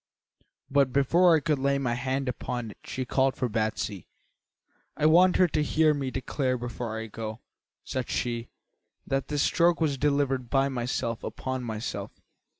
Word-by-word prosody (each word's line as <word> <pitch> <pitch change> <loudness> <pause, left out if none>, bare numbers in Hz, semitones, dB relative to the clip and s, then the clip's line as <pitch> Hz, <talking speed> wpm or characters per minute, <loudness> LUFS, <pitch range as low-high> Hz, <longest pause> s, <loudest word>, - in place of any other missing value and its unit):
"But 140 -2 +3
before 165 +6 +5
I 155 - +2
could 150 -1 0
lay 140 +1 +2
my 130 -4 -1
hand 130 +2 -2
upon 120 -2 -3
it - - -16
she 130 - -4
called 130 +1 +2
for 125 - -1
Batsy. 110 -4 -2 0.9
'I 150 - +1
want 180 +4 +6
her 185 - +5
to 155 - 0
hear 155 +1 +3
me 140 -2 -2
declare 130 0 -1
before 120 -2 -5
I 110 - -4
go,' 110 0 -6 0.4
said 130 -2 -4
she, 120 -1 -2 0.6
'that 135 0 -1
this 145 -1 0
stroke 170 0 +3
was 145 -5 0
delivered 140 -3 +1
by 135 0 +2
myself 120 -2 -2
upon 130 +3 -4
myself.' 110 -1 -5
130 Hz, 160 wpm, -27 LUFS, 120-145 Hz, 0.9 s, want